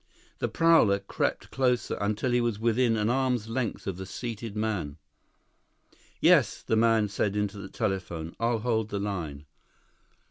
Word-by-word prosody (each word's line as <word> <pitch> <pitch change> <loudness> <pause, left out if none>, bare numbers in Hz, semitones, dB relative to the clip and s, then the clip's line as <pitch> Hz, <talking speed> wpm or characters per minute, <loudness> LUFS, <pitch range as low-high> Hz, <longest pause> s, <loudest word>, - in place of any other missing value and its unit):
The - - 0
prowler 165 -12 +4
crept 100 0 -3
closer 125 -2 +1
until 105 +5 0
he 120 0 +3
was 120 -3 0
within 115 +1 +2
an 105 0 +1
arm's 125 -4 0
length 120 -1 -2
of 95 -3 -3
the 95 0 -7
seated 115 0 -6
man. 105 -10 -2 1.2
"Yes," - - +4
the - - 0
man 110 -1 +3
said 100 0 -1
into 105 -1 -2
the 95 -1 -8
telephone. 90 -7 -3
"I'll 115 0 +1
hold 110 -2 0
the 100 - -3
line." 85 -8 -4
110 Hz, 150 wpm, -28 LUFS, 100-120 Hz, 1.2 s, prowler